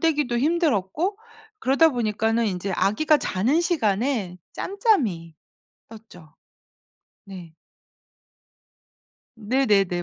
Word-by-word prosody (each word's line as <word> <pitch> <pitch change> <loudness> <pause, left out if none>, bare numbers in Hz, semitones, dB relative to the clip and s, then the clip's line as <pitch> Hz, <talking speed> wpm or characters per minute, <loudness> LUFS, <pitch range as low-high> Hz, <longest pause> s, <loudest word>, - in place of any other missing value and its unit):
떼기도 295 -7 0
힘들었고 315 - 0 0.4
그러다 275 +3 +3
보니까는 225 -2 0
인제 190 -1 -3
아기가 215 - +2
자는 250 - 0
시간에 230 - -1 0.2
짬짬이 260 - -1 0.6
떴죠. 180 -8 -15 0.9
네. 180 -5 -11 1.8
네네네. 205 -6 +1
225 Hz, 200 characters per minute, -23 LUFS, 195-300 Hz, 1.8 s, 그러다